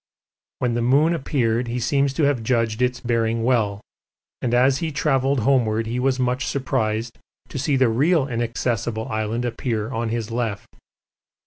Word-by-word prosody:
When 125 -2 0
the 120 - 0
moon 140 +7 +3
appeared 125 -6 0
he 120 +1 -2
seems 140 +4 +1
to 155 - 0
have 140 -4 +2
judged 115 -1 0
its 125 0 +1
bearing 115 -1 0
well, 110 -5 +1 0.6
and 120 - -1
as 130 +2 +3
he 165 -1 -2
travelled 135 -3 +1
homeward 115 -3 +2
he 120 +2 -2
was 130 0 +1
much 125 +1 0
surprised 115 -4 -2 0.3
to 135 - -5
see 140 +2 +1
the 130 -1 +4
real 140 +6 +2
Inaccessible 115 -1 -2
Island 110 +2 -2
appear 115 -2 -2
on 115 -2 -2
his 115 -1 -3
left. 115 -3 -3
120 Hz, 160 wpm, -22 LUFS, 115-135 Hz, 0.6 s, the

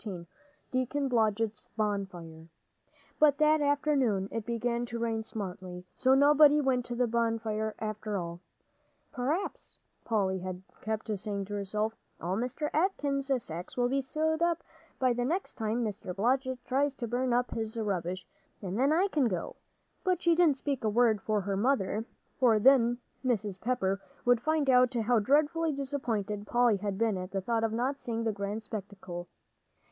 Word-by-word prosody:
XIV 185 -6 -6 0.5
DEACON 265 +2 0
BLODGETT'S 220 -2 0
BONFIRE 185 -6 -3 0.7
But 295 -2 +5
that 305 0 +4
afternoon 280 -9 +1
it 225 -2 -4
began 235 0 -1
to 235 - -4
rain 225 -1 -1
smartly, 185 -4 -6
so 260 0 +4
nobody 295 +1 +6
went 260 -4 +1
to 240 - -4
the 250 +1 +2
bonfire 225 -2 -1
after 215 -1 -3
all. 170 -1 -5 0.7
"P'r'aps," 300 +8 -3 0.3
Polly 195 -4 0
had 185 0 -6 0.2
kept 220 0 -3
saying 200 -1 -3
to 205 - -7
herself, 210 +2 -1 0.3
"all 175 +3 -2
Mr. 250 +7 -2
Atkins' 285 -6 0
sacks 170 +7 -7
will 245 0 +2
be 275 +1 +1
sewed 315 +4 -1
up 340 -1 +1 0.3
by 255 -2 +2
the 245 +1 -1
next 340 +10 -1
time 225 +1 -1
Mr. 195 -3 -5
Blodgett 255 +4 0
tries 275 +2 +1
to 240 - -4
burn 250 +2 0
up 245 +1 +1
his 220 0 -3
rubbish, 185 -3 -2 0.3
and 195 +2 -4
then 275 +3 +4
I 355 +5 +3
can 295 -9 +2
go," 180 -6 -3 0.5
but 365 -2 +1
she 340 - +5
didn't 325 -5 +4
speak 275 -2 -2
a 215 - +2
word 220 -2 +3
to 215 - +1
her 195 +1 -2
mother, 220 -1 +1 0.3
for 235 -4 +5
then 240 0 +5 0.3
Mrs. 210 -7 -1
Pepper 195 -6 0 0.2
would 245 -1 +4
find 310 0 +1
out 250 -1 +5
how 235 0 +3
dreadfully 305 +7 +2
disappointed 230 -8 -3
Polly 240 -3 +3
had 200 -1 -3
been 220 -3 +1
at 185 0 -5
the 195 -1 -2
thought 225 +3 0
of 225 - +1
not 255 +5 -1
seeing 230 -1 -3
the 225 - +1
grand 205 +2 -4
spectacle. 195 -4 -7
230 Hz, 165 wpm, -30 LUFS, 205-270 Hz, 0.7 s, nobody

